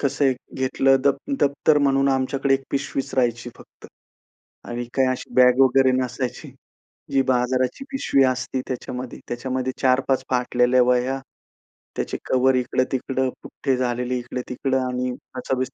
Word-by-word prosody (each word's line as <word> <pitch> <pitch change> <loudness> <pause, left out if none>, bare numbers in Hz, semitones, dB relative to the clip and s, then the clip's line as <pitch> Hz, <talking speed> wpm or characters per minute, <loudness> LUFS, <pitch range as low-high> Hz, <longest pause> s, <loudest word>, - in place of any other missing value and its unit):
कसं 140 0 0
आहे, 130 - +3 0.2
घेतलं 135 +1 +3
द - - +6 0.3
दप्तर 145 +2 +3
म्हणून 135 -1 +2
आमच्याकडे 135 +1 +1
1 135 - -2
पिशवीच 135 -1 -3
राहायची 120 -2 0
फक्त - - -16 0.8
आणि 120 0 -3
काही 130 -1 +3
अशी 130 - -4
बॅग 125 0 +5
वगैरे 130 0 +4
नसायची. 125 0 -4 0.6
जी 135 -1 +3
बाजाराची 130 - 0
पिशवी 270 - +2
असती 130 0 -1
त्याच्यामध्ये 125 -1 -5
त्याच्यामध्ये 130 +1 -2
4-5 130 0 +2
फाटलेल्या 125 0 +3
वह्या, 125 +2 +1 0.8
त्याचे - - -2
कव्हर 130 +1 +3
इकडं-तिकडं, 130 +1 0
पुठ्ठे 135 -2 -2
झालेले 125 0 -1
इकडं-तिकडं 125 +2 -3
आणि 125 0 -2 0.3
असं 130 +1 -2
130 Hz, 130 wpm, -23 LUFS, 125-135 Hz, 0.8 s, द